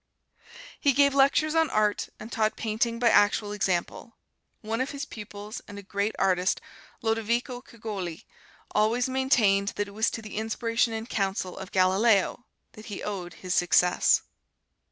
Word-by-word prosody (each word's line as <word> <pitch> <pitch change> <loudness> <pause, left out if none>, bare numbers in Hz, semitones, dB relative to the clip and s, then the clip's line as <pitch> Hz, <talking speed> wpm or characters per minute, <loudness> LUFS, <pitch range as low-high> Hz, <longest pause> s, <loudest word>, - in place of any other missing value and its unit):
He 280 -2 +3
gave 280 +1 +4
lectures 280 +3 +3
on 325 -2 +3
Art, 210 -3 +1
and 220 +2 -9
taught 215 -2 0
Painting 230 +1 -1
by 235 0 +3
actual 205 0 +3
example. 195 +2 -2 0.4
One 225 +2 -2
of 265 - -1
his 285 0 -5
pupils, 210 -1 -8
and 205 - -9
a 200 - -8
great 200 +2 -2
artist, 185 0 +2 0.4
Lodovico 235 +3 -1
Cigoli, 205 -9 -6 0.5
always 225 +4 +2
maintained 225 -7 +2
that 205 0 -2
it - - -11
was 220 +2 +1
to 225 - -6
the 215 -1 -8
inspiration 230 +1 0
and 225 +1 -4
counsel 195 -4 -2
of 190 0 -8
Galileo 195 +5 +3 0.3
that 215 - -13
he 205 -4 -6
owed 185 -4 -5
his 180 - 0
success. 180 0 +3
215 Hz, 155 wpm, -27 LUFS, 200-235 Hz, 0.5 s, gave